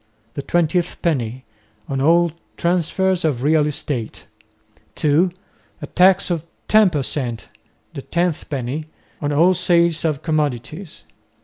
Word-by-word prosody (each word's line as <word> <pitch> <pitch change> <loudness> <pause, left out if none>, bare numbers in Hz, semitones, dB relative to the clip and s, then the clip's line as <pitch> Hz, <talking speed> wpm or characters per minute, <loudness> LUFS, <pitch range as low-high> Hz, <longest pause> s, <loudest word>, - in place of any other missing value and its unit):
the - - -4
"twentieth 175 +3 0
penny," 130 -6 -1 0.4
on 135 -1 -2
all 170 +3 +4 0.3
transfers 180 +2 +1
of 140 -6 0
real 150 0 +3
estate, 135 -5 -4 0.7
(2) 155 +5 +3 0.5
a - - -6
tax 185 0 +3
of 165 -3 -1 0.2
ten 215 -2 +5
per 150 -5 -1
cent., 125 -5 -4 0.4
the 140 - -6
"tenth 170 +2 -2
penny," 140 +2 -3 0.4
on 145 -1 -1
all 170 +6 +4
sales 170 -2 +2
of 155 -4 -1
commodities. 155 - -3
155 Hz, 125 wpm, -20 LUFS, 140-175 Hz, 0.7 s, ten